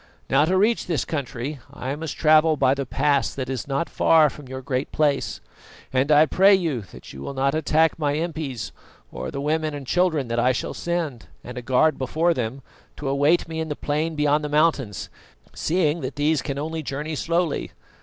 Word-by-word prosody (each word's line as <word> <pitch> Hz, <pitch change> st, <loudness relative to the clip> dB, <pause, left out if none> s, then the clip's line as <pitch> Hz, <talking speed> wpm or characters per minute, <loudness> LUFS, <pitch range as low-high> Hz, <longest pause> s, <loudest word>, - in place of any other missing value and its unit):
Now, 140 Hz, +3 st, +5 dB
to 185 Hz, +3 st, +1 dB
reach 220 Hz, +4 st, +2 dB
this 165 Hz, -4 st, 0 dB
country, 140 Hz, -1 st, -4 dB
I 130 Hz, +3 st, -4 dB
must 160 Hz, 0 st, -6 dB
travel 155 Hz, 0 st, +5 dB
by 135 Hz, -1 st, +3 dB
the 140 Hz, -2 st, -3 dB
pass 140 Hz, +1 st, +1 dB
that 130 Hz, -1 st, -4 dB
is 130 Hz, 0 st, -4 dB
not 140 Hz, +4 st, -1 dB
far 155 Hz, -3 st, +4 dB
from 145 Hz, -3 st, -12 dB
your 130 Hz, 0 st, -7 dB
Great 130 Hz, 0 st, -2 dB
Place, 145 Hz, -2 st, 0 dB, 0.5 s
and 130 Hz, +3 st, +2 dB
I 150 Hz, +1 st, +7 dB
pray 195 Hz, +5 st, +5 dB
you 165 Hz, -10 st, -1 dB
that -, -, -12 dB
you 65 Hz, -, -9 dB
will 140 Hz, -, -6 dB
not 135 Hz, +1 st, +1 dB
attack 160 Hz, +1 st, +2 dB
my 145 Hz, -2 st, +1 dB
impis 155 Hz, -7 st, -4 dB, 0.4 s
or -, -, -5 dB
the 140 Hz, -, -5 dB
women 155 Hz, +1 st, -1 dB
and 140 Hz, -2 st, -7 dB
children 160 Hz, -3 st, +1 dB
that 115 Hz, 0 st, 0 dB
I 125 Hz, +2 st, +3 dB
shall -, -, -3 dB
send, 165 Hz, -9 st, -3 dB, 0.2 s
and 125 Hz, -, -8 dB
a 125 Hz, -, -5 dB
guard 135 Hz, +5 st, +2 dB
before 160 Hz, +6 st, +1 dB
them, 125 Hz, -1 st, -4 dB, 0.3 s
to 140 Hz, -, -3 dB
await 145 Hz, +6 st, +2 dB
me 160 Hz, 0 st, -5 dB
in 160 Hz, 0 st, -3 dB
the 150 Hz, -, -2 dB
plain 155 Hz, +3 st, -2 dB
beyond 150 Hz, 0 st, +2 dB
the 150 Hz, -, -3 dB
mountains, 145 Hz, -, +1 dB, 0.4 s
seeing 160 Hz, -1 st, 0 dB
that -, -, -5 dB
these 150 Hz, 0 st, +1 dB
can 140 Hz, -2 st, -4 dB
only 160 Hz, +2 st, -3 dB
journey 150 Hz, +2 st, -4 dB
slowly. 165 Hz, +1 st, -1 dB
150 Hz, 200 wpm, -23 LUFS, 135-160 Hz, 0.5 s, I